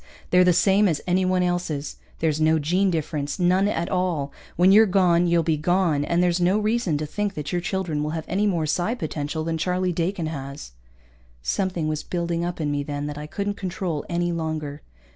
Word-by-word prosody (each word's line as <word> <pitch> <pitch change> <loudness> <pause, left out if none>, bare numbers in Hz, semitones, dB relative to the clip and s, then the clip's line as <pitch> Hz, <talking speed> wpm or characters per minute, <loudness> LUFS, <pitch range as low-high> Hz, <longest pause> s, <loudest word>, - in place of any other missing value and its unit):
They're 180 0 +6
the 180 - +5
same 195 +4 +4
as 160 -5 0
anyone 185 0 +2
else's. 175 -5 -2 0.2
There's 155 -1 +1
no 160 +1 +4
gene 180 +6 +1
difference, 150 -3 -2
none 185 +2 +3
at 170 -4 -1
all. 175 -7 -1 0.2
When 180 +3 +5
you're 215 +2 +7
gone, 180 -2 +3
you'll 170 -1 +3
be 160 -1 +1
gone, 170 -2 +1
and 170 +2 +1
there's 175 0 +1
no 180 +4 +3
reason 215 -6 0
to 155 - -3
think 205 +5 -3
that 150 -1 -4
your 175 - 0
children 175 -5 -2
will 150 - -2
have 160 0 -4
any 200 +4 +1
more 170 -5 0
psi 175 +9 0
potential 155 -5 -3
than 165 0 -2
Charlie 180 +1 0
Dakin 170 +1 -1
has." 140 - -6 0.7
Something 180 - -1
was 155 -1 -1
building 170 -1 -2
up 175 0 -3
in 150 -2 -1
me 145 0 -1
then 145 0 -4
that 150 0 -5
I 150 - -6
couldn't 200 +4 -3
control 180 -4 -3
any 175 0 0
longer. 155 -3 -4
170 Hz, 200 wpm, -24 LUFS, 155-185 Hz, 0.7 s, you're